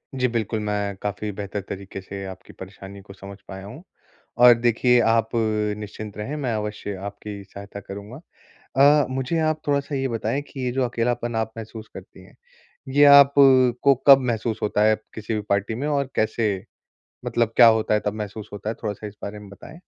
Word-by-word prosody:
जी 125 -1 +1
बिल्कुल, 110 -2 -2
मैं 105 -1 -2
काफ़ी 105 +1 -3
बेहतर 100 0 -5
तरीके 95 0 -7
से 100 +1 -8
आपकी 95 -1 -10
परेशानी 95 +1 -11
को 100 0 -13
समझ 100 0 -11
पाया 95 0 -8
हूँ। 125 - -11 0.6
और 120 0 +9
देखिए 120 +1 +3
आप 115 0 +2 0.5
निश्चिंत 105 0 -8
रहें, 130 +8 -4
मैं 130 -6 -2
अवश्य 105 -1 -4
आपकी 100 0 -8
सहायता 100 +1 -10
करूँगा। 100 +6 -9 0.6
अ, 145 +1 +5
मुझे 135 +5 -2
आप 155 -1 0
थोड़ा-सा 140 0 -1
ये 135 -1 -1
बताएँ 115 +4 -2
कि 135 - -9
ये 125 - 0
जो 130 0 0
अकेलापन 120 -1 -2
आप 110 0 -2
महसूस 110 0 -9
करती - - -12
है, - - -19 0.5
ये 145 +2 +4
आप 140 -1 +8 0.5
को 140 -1 +5
कब 135 -1 +9
महसूस 110 0 -3
होता 105 0 +1
है 110 0 +4 0.2
किसी 110 0 -4
भी 105 - -1
पार्टी 100 +2 0
में? 135 +6 -3
और 140 -2 -1
कैसे 110 -1 +1 0.7
मतलब 115 -1 0
क्या 120 - +9
होता 110 -1 +3
है 105 - +2
तब 105 - 0
महसूस 105 0 -6
होता 105 +1 -5
है, - - -4
थोड़ा-सा 105 0 -4
इस 105 0 -10
बारे 105 +1 -6
में 105 -1 -12
बताएँ? 100 - -13
110 Hz, 190 wpm, -23 LUFS, 100-125 Hz, 0.7 s, और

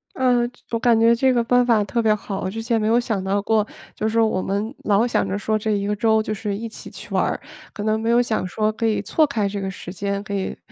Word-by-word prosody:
呃， 250 -2 +3
这 245 - -25
我 230 - 0
感 235 -2 +4
觉 230 +1 +5
这 260 +2 +3
个 240 - +3
办 245 +1 +3
法 225 -4 +3
特 235 +4 0
别 220 -1 +3
好。 205 -2 -4
我 185 - -2
之 225 +3 -4
前 230 0 0
没 215 - 0
有 230 +2 +4
想 220 -5 -2
到 195 +1 0
过。 215 0 +2 0.3
就 215 - -1
是 225 +1 +1
我 220 -4 +2
们 205 +6 -2
老 210 +2 +3
想 240 - +1
着 195 +1 -2
说 215 +1 0
这 215 0 -2
一 200 -1 0
个 210 - 0
周 220 +1 +3
就 215 - -3
是 205 -1 -3
一 230 +2 -5
起 220 - -10
去 - - -9
玩 - - +3
儿， - - -1 0.3
可 205 - -5
能 215 0 +1
没 225 +1 -1
有 235 +1 +5
想 225 -5 -1
说 215 +3 0
可 225 +1 -3
以 220 -2 +1
错 305 +10 +2
开 220 -7 0
这 200 0 -4
个 190 - -2
时 180 -1 -8
间， 200 +1 -2
可 205 - -6
以 195 -1 -3
220 Hz, 310 characters per minute, -22 LUFS, 200-230 Hz, 0.3 s, 觉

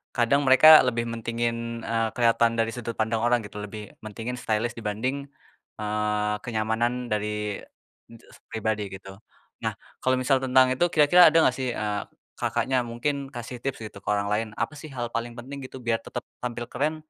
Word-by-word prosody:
kadang 130 +4 +3
mereka 155 +4 +9
lebih 115 -1 0
mentingin, 115 0 -3
eee, 115 -1 0
keliatan 115 -1 +3
dari 115 0 +1
sudut 120 -1 -5
pandang 110 0 0
orang 120 0 +3
gitu, 105 - -10
lebih 105 0 -8
mentingin 115 +4 -5
stylish 110 +2 -1
dibanding, 125 +6 -3 0.5
eee, 105 0 -1
kenyamanan 110 +1 0 0.2
dari 105 0 -2 0.5
enjes 115 -1 -16
pribadi 110 -2 -2
gitu. 95 +1 -11 0.4
Nah, - - -1 0.3
kalau 130 0 +2
misal 135 +1 +3
tentang 130 0 +4
itu, 175 - +2
kira-kira 165 +4 +7
ada 165 - +2
nggak 130 - +3
sih, 130 -1 -2
eee, 105 -1 -2 0.3
Kakaknya 130 -2 0
mungkin 135 +4 -3
kasih 120 0 -6
tips 135 0 -4
gitu, - - -14
ke 100 - -15
orang 100 0 -1
lain, 110 +2 0
apa 155 - -1
sih 155 +1 -9
hal 120 -2 -3
paling 120 0 -4
penting 135 +4 -8
gitu, 130 - -9
biar 115 -2 +1
tetep - - -5 0.2
tampil 120 -1 -4
keren, 150 +5 -1
115 Hz, 170 wpm, -26 LUFS, 110-130 Hz, 0.5 s, mereka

